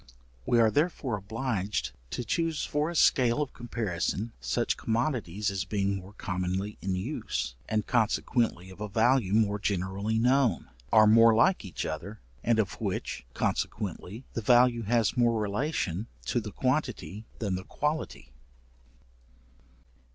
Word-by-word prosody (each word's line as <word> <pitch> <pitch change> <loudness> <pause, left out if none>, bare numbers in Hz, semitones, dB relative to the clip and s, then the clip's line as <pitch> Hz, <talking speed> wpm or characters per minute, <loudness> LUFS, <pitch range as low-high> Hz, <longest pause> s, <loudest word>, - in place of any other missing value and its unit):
We 120 - +4
are, 110 -1 +5
therefore, 145 -5 0
obliged 105 0 -2 0.2
to 125 - -3
choose 165 +6 -1
for 150 +2 0
a 170 - -5
scale 125 -4 +4
of 145 -3 -2
comparison, 110 -2 -2
such 60 0 0
commodities 110 - -1
as 95 -1 -2
being 100 0 -1
more 95 +2 -10
commonly 95 +1 -3
in 95 0 -1
use, 105 - -3 0.2
and 110 -1 0
consequently 110 -4 0
of 95 - -13
a 105 - -3
value 115 0 +3
more 105 -2 +2
generally 100 +3 -1
known, 125 - +2 0.2
are 110 - +7
more 115 +1 +7
like 180 - +3
each 95 -5 -5
other, 95 +7 -5 0.2
and 115 0 +3
of 110 -3 -1
which - - -3
consequently 105 +2 -2
the 115 - -2
value 120 +1 +5
has 115 -1 +1
more 120 -2 +3
relation 105 - -1 0.2
to 120 - +1
the 105 -2 -6
quantity 125 -6 -2
than 105 -4 -2
the 95 +1 -3
quality. 150 - -3
110 Hz, 140 wpm, -29 LUFS, 95-120 Hz, 0.2 s, are